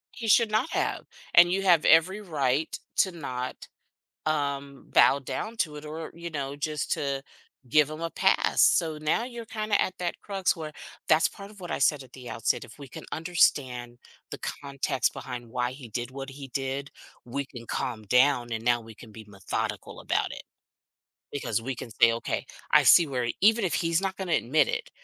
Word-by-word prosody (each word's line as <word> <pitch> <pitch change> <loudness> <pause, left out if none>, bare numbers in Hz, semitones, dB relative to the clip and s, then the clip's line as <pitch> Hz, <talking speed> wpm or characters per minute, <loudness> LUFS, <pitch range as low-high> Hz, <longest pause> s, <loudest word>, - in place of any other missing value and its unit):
He 230 - -5
should 220 +1 +5
not 220 +8 +1
have, - - -1 0.3
and 175 0 +8
you 195 +1 0
have 175 -5 +5
every 185 +6 +5
right 150 -5 0 0.2
to 190 - +3
not, 130 -7 -5 0.6
um, 140 -2 -2
bow 135 - +6
down 215 - -5
to 155 -8 -1
it 150 +1 -8
or, 160 +1 -6
you 170 +1 -7
know, 140 -3 -4
just 150 0 -3
to 140 -1 -1 0.4
give 150 +3 +4
him 155 +1 -7
a 165 0 -3
pass. 190 - +2
So 160 -3 +3
now 155 +9 +1
you're 240 -2 -7
kinda 215 -1 0
at 185 - -1
that 175 -1 -3
crux 195 -2 0
where 155 -2 -6 0.4
that's 160 +1 +5
part 200 -1 -11
of 210 -1 -15
what 175 -2 -7
I - - -1
said 145 -3 +2
at 125 - -18
the 125 -2 -9
outset, 115 - 0
if - - -14
we 140 -2 -10
can - - -10
understand 130 -7 +1 0.3
the - - -6
context 140 -2 -2
behind 120 -2 -7
why 125 +1 -1
he 130 -1 -10
did 120 +3 -4
what 135 0 -6
he 135 0 -9
did, 135 +2 -3 0.3
we 140 +4 -3
can 120 -3 -11
calm 115 -1 -3
down 125 +1 +3
and 115 0 -3
now 120 0 +3
we 115 0 -12
can 110 +1 -14
be 110 +1 -10
methodical 100 -2 -4
about - - 0
it - - -8 0.9
because 140 -4 -2
we 135 +3 -3
can 120 - -7
say, 115 +1 +5
"Okay, 115 - -3 0.3
I - - +7
see 170 - +7
where 125 -4 -1
even 220 +2 +5
if 180 - 0
he's 165 0 +1
not 195 -1 -2
gonna 190 -3 -3
admit 150 +2 +3
it, - - -3
145 Hz, 195 wpm, -27 LUFS, 125-175 Hz, 0.9 s, and